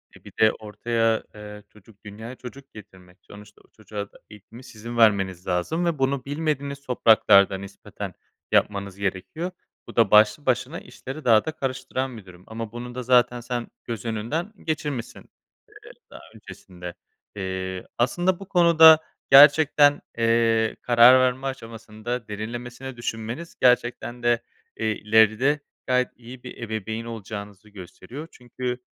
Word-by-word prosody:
eee, - - -18
bir - - -13
de 110 0 +6
ortaya, 115 +1 -1
eee, 105 0 -10
çocuk 105 0 -21
dünyaya 110 +4 -9
çocuk 135 +2 -12
getirmek. 95 -3 -15
Sonuçta 105 0 -15
o - - -27
çocuğa 105 -2 -8
da - - -18
eğitimi 105 +4 -14
sizin 115 0 -9
vermeniz 95 -5 +2
lazım 95 - -1
ve 170 -4 -1
bunu 135 0 0
bilmediğiniz 140 -1 -3
topraklarda 110 -6 +4
nispeten 100 +1 -9 0.4
yapmanız 100 -2 +1
gerekiyor. 100 - -4 0.4
Bu - - -11
da 115 -4 +3
başlı 105 +6 +5
başına 130 +5 -1
işleri 135 +4 -10
daha 110 -3 +5
da 160 - -2
karıştıran 130 -3 -4
bi 105 - -12
durum. 90 -1 -15
Ama 110 -1 -6
bunu 120 +1 -8
da 125 - -4
zaten 125 0 +3
sen 120 -1 -4 0.2
göz 115 -1 -6
önünden 120 - -3
geçirmişsin, 150 -6 -4
eee, - - -28 0.6
daha - - -12
öncesinde. 90 -2 -11 0.4
Eee, 95 -1 -5
aslında 175 +10 +1
bu 195 - -10
konuda 165 -4 +7 0.3
gerçekten, 145 +1 +7 0.2
eee, 115 -1 +2
karar 120 +2 +7
verme 130 +1 0
aşamasında 115 -1 -6
derinlemesine 120 +5 -7
düşünmeniz 120 +7 -5
gerçekten 125 -1 +1
de, 120 0 +2 0.4
eee, 110 - -2
ileride 110 +7 +3 0.3
gayet 125 0 +2
iyi 125 +1 -12
bir 125 - -10
ebeveyn 110 0 -4
olacağınızı 105 -2 -8
gösteriyor. 105 - -10
Çünkü, 125 0 -5
115 Hz, 140 wpm, -24 LUFS, 105-130 Hz, 0.6 s, konuda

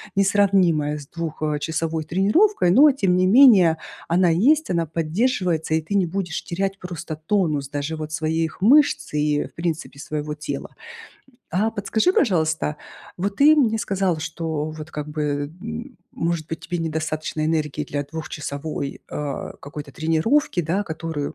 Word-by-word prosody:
несравнимая 190 -7 +3
с 140 - -12
2 165 -2 -6 0.2
часовой 160 +1 -2
тренировкой, 195 - +3
но 285 +11 +7
тем 195 -9 +1
не 180 - +3
менее 190 -6 +7 0.3
она 180 +2 +3
есть, 275 - +3
она 170 -2 +1
поддерживается, 165 +1 0
и 160 - +1
ты 160 +6 -4
не 195 -2 +3
будешь 175 -1 -3
терять 195 +2 -2
просто 170 -3 -6
тонус 155 -4 0
даже 145 +2 -3
вот 155 -1 -6
своих 160 +1 -2
мышц 285 - +4
и, 150 0 +1
в - - -14
принципе, 165 -3 -3
своего 150 +1 -4
тела. 150 0 -6 0.8
А 205 +6 +1
подскажи, 220 - +1
пожалуйста, 160 - +1 0.4
вот 200 +2 -2
ты 300 +2 +7
мне 240 -7 +3
сказал, 195 -5 0
что 160 -1 -3
вот 155 0 -9
как 150 -1 -5
бы, 155 0 -4
э, 145 +5 -3
м, 235 +3 -6 0.2
может 165 -2 -2
быть, 160 - -5
тебе 175 - -4
недостаточно 155 -1 -2
энергии 150 -2 -1
для 145 0 -3
двухчасовой, 150 -1 -5
а, 145 -2 -4
какой-то 145 0 -8
тренировки, 165 - +1
да, 170 +6 0
которую, 160 -4 -4
165 Hz, 150 wpm, -22 LUFS, 155-195 Hz, 0.8 s, но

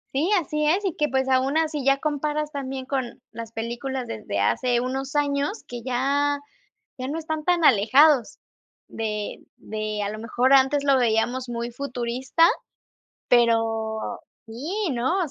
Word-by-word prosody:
Sí, 315 +8 +1
así 300 -1 -2
es, 365 +7 +2
y 370 - -1
que, 300 - 0
pues, 265 +1 0
aún 265 +3 +2
así 310 -3 0
ya 275 +1 +4
comparas 300 +1 -2
también 265 -2 -4
con 260 -3 -3
las 230 -1 -7
películas 240 +3 -4
desde 100 -2 -4
hace 240 - +2
unos 265 +2 -3
años 290 +6 -1
que 240 -1 -7
ya 280 +3 +1 0.6
ya 255 - -3
no 295 +4 -3
están 315 -1 -4
tan 355 -2 +2
alejados 260 +4 +5 0.5
de 210 -2 -4 0.2
de, 215 -1 -4
a 200 - -2
lo 215 +1 -6
mejor, 240 +4 +2
antes 275 +1 +4
lo 275 -1 +4
veíamos 240 +2 +1
muy 235 0 -4
futurista, 255 +4 +1 0.8
pero 225 -2 +1 0.3
sí, 320 - -3
¿no? 255 +9 0
260 Hz, 150 wpm, -24 LUFS, 235-290 Hz, 0.8 s, alejados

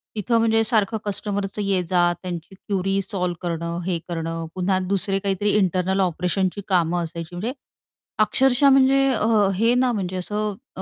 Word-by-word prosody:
तिथं 220 +2 +1
म्हणजे 225 0 +3
सारखं 220 -1 +1
कस्टमरच 200 0 -3
ये-जा, 185 -3 +1 0.2
त्यांची 180 0 -6
क्युरी 195 0 -1
सॉल्व्ह 180 -3 -3
करणं, 170 -1 -3
हे 180 -2 0
करणं, 165 -1 -3
पुन्हा 185 +1 +1
दुसरे 195 +1 -1
काहीतरी 200 +1 0
इंटरनल 190 0 +1
ऑपरेशनची 180 +2 0
कामं 175 -2 +1
असायची, 165 +1 -7
म्हणजे 220 +8 -3 0.7
अक्षरशः 265 +5 +4
म्हणजे 270 0 +5
अ, 220 -2 0 0.3
हे 225 +5 +3
ना 250 0 +2
म्हणजे 190 -5 -3
असं 210 +3 -3 0.2
अ - - -6
195 Hz, 150 wpm, -23 LUFS, 180-215 Hz, 0.7 s, म्हणजे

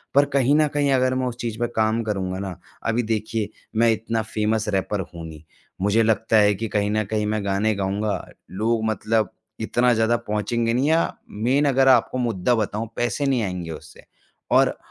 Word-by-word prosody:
पर 140 - +6
कहीं 140 +1 +3
न 155 0 +4
कहीं 145 -1 +2
अगर 130 0 +2
मैं 130 - 0
उस 120 - -4
चीज़ 115 -2 -3
पे 120 - +1
काम 110 +1 +2
करूँगा 95 -3 -2
ना 95 -3 -5 0.3
अभी 115 +2 +1
देखिए, 110 -1 -2 0.3
मैं 115 +1 +4
इतना 110 +1 -1
फ़ेमस 110 0 -1
रैपर 100 +1 -1
हूँ 85 -1 -7
नहीं। 80 -1 -11 0.4
मुझे 105 +3 +3
लगता 110 0 +2
है 105 -1 +5
कि 115 +3 -3
कहीं 105 0 +1
न 110 0 +1
कहीं 110 -1 0
मैं 105 -1 -1
गाने 100 +3 +1
गाऊँगा, 100 +2 -2 0.3
लोग 110 +3 0
मतलब 110 -1 0 0.3
इतना 120 0 +2
ज़्यादा 115 +1 +2
पहुँचेंगे 115 +2 0
नहीं 130 +4 +1
या 165 +1 +4 0.3
मेन 125 +7 +1
अगर 135 -1 +3
आपको 130 0 +4
मुद्दा 120 -1 +1
बताऊँ, 110 +1 -2
पैसे 120 +4 -1
नहीं 130 -5 +1
आएँगे 90 -4 -4
उससे 80 - -11 0.5
और - - +4
110 Hz, 190 wpm, -23 LUFS, 105-120 Hz, 0.5 s, पर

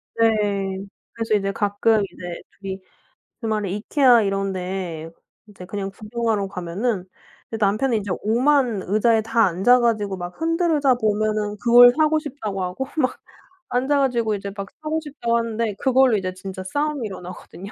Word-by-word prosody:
네. 200 -4 +1 0.3
그래서 225 -2 0
이제 195 -1 0
가끔 205 +2 +1
이제 175 -1 -8 0.2
2 195 -1 -7
이 190 0 -6 0.6
주말에 215 -3 -1
Ikea 235 +3 +3
이런데 190 -4 -3 0.4
이제 195 -3 -12
그냥 195 +1 -4
구경하러 215 0 -2
가면은 185 +3 -3 0.5
남편은 220 +4 +2
이제 200 -2 -5
오만 245 -1 +2
의자에 220 +3 +2
다 225 +1 +2
앉아 195 +8 +4
가지고 215 -5 0
막 175 0 -6
흔들의자 325 -5 +2
보면은 215 -2 0
그걸 245 +1 +8
사고 310 0 +3
싶다고 215 - -5
하고 180 +9 -3
막 260 -4 0 0.5
앉아 265 +4 +1
가지고 235 -5 +1
이제 200 0 -6
막 200 -1 -5 0.2
사고 310 +1 -1
싶다고 270 -6 -1
하는데 230 -1 -1
그걸로 260 -2 +4
이제 185 -2 -3
진짜 190 0 -7
싸움이 290 +4 -2
일어나거든요. 185 +1 -9
215 Hz, 330 characters per minute, -22 LUFS, 195-245 Hz, 0.6 s, 그걸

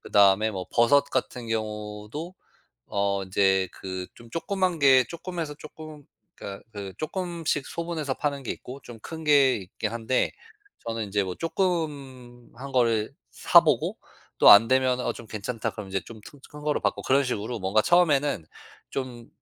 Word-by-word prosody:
그다음에 100 +2 +4
뭐 95 -3 -5
버섯 140 +5 +5
같은 125 -2 -2
경우도 110 - -5 0.5
어 100 -1 -1
인제 95 0 +2
그 95 -1 -6
좀 120 -1 -15
조그만 185 - -1
게 135 -3 +6
조그마해서 170 -3 -5
쪼끔 155 0 -11 0.3
그러니까 100 0 -8
그 100 -2 -7
쪼끔씩 165 -3 -2
소분해서 165 -5 -3
파는 140 -2 -2
게 - - -3
있고 130 +3 -9
좀 115 -2 -11
큰 160 -1 -8
게 140 -3 +5
있긴 100 +3 -5
한데 115 +2 0 0.5
저는 115 -1 -3
인제 100 0 0
뭐 95 - -4
쪼끔한 140 -8 -4
거를 115 -4 +2 0.2
사 - - +6
보고 - - 0 0.4
또 - - +7
안 110 +3 +9
되면은 130 -1 +2
"어, - - +1
좀 115 - -11
괜찮다." 110 +2 -4
그러면 100 -3 -8
인제 95 0 -1
좀 110 -2 -11
튼 145 - -14
큰 150 0 -11
거로 150 0 0
바꾸고 - - -1
그런 135 +1 +3
식으로 120 -1 -3
뭔가 95 +3 +2
처음에는 145 - +3 0.5
좀 125 -3 -5
125 Hz, 310 characters per minute, -26 LUFS, 105-150 Hz, 0.5 s, 안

